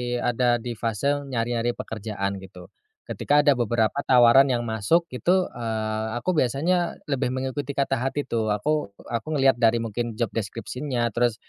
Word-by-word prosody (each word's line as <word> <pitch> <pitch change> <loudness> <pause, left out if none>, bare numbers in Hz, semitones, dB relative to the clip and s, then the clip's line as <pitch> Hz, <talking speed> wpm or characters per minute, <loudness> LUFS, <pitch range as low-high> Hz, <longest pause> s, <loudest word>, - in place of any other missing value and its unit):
ada 120 0 +1
di 120 -3 -5
fase 140 +6 -1
nyari-nyari 120 -1 -1
pekerjaan 100 -3 -4
gitu. 90 -2 -13 0.3
Ketika 145 +1 +1
ada 145 - +5
beberapa 120 0 +1
tawaran 125 +2 +6
yang 120 -3 0
masuk 110 +9 +1
itu, 180 - +1
eee, 110 -2 -3
aku 120 +10 -1
biasanya 165 +7 +1
lebih 135 -3 -1
mengikuti 135 +2 -3
kata 135 -2 0
hati 135 +3 -1
tuh 115 -3 -1
aku 105 0 -1 0.2
aku 115 +2 -3
ngeliat 135 -1 +4
dari 115 -1 +4
mungkin 115 +1 -3
job 115 -2 -1
deskripsinya 120 +4 -3
terus, 120 +1 +1
120 Hz, 150 wpm, -24 LUFS, 110-135 Hz, 0.3 s, tawaran